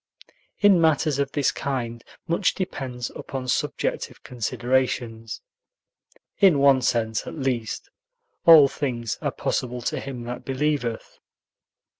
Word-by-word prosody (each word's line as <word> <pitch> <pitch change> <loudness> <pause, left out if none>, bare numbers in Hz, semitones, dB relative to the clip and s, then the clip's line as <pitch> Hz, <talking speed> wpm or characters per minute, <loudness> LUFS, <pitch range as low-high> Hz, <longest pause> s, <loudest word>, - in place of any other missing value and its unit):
In 200 -4 +6
matters 155 -2 +2
of 140 -1 0
this 145 -3 +2
kind, 120 -4 -4 0.2
much 170 +3 +1
depends 130 -10 -4
upon 130 -1 -6
subjective - - -2
considerations; 120 -2 -2 1.0
in 190 -7 +6
one 140 -1 +5
sense, 110 -3 0
at - - -6
least, 130 -6 -2 0.6
"all 160 -4 +9
things 120 -6 -3
are - - 0
possible 125 -1 -3
to - - -1
him 130 -3 -6
that 120 +1 -6
believeth." 135 -4 -2
130 Hz, 115 wpm, -24 LUFS, 120-145 Hz, 1.0 s, all